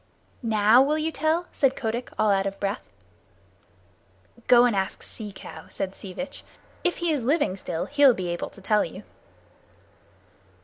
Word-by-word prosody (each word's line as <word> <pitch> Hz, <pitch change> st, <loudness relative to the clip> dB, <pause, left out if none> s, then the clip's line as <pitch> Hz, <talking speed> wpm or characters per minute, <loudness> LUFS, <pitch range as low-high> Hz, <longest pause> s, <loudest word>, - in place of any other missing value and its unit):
"Now 220 Hz, +1 st, +5 dB
will 295 Hz, +3 st, +2 dB
you 315 Hz, +1 st, -1 dB
tell?" 315 Hz, +3 st, 0 dB
said 270 Hz, -2 st, +2 dB
Kotick, 235 Hz, +1 st, -3 dB
all 215 Hz, -1 st, +3 dB
out 195 Hz, 0 st, +2 dB
of 195 Hz, -, -5 dB
breath. 200 Hz, +3 st, -2 dB, 1.7 s
"Go 245 Hz, -1 st, +7 dB
and 240 Hz, -4 st, +2 dB
ask 190 Hz, -1 st, -2 dB
Sea 210 Hz, -2 st, -6 dB
Cow," 195 Hz, -, -10 dB
said 195 Hz, -1 st, -4 dB
Sea 195 Hz, -, -9 dB
Vitch. 275 Hz, +7 st, -7 dB, 0.4 s
"If 355 Hz, -, +1 dB
he 345 Hz, -1 st, 0 dB
is 285 Hz, -6 st, -1 dB
living 285 Hz, -, +1 dB
still, 170 Hz, -3 st, -4 dB
he'll 280 Hz, -3 st, +5 dB
be 180 Hz, -2 st, -3 dB
able 175 Hz, 0 st, -3 dB
to 195 Hz, -, -15 dB
tell 210 Hz, +1 st, +3 dB
you." -, -, -8 dB
235 Hz, 165 wpm, -25 LUFS, 195-285 Hz, 1.7 s, Go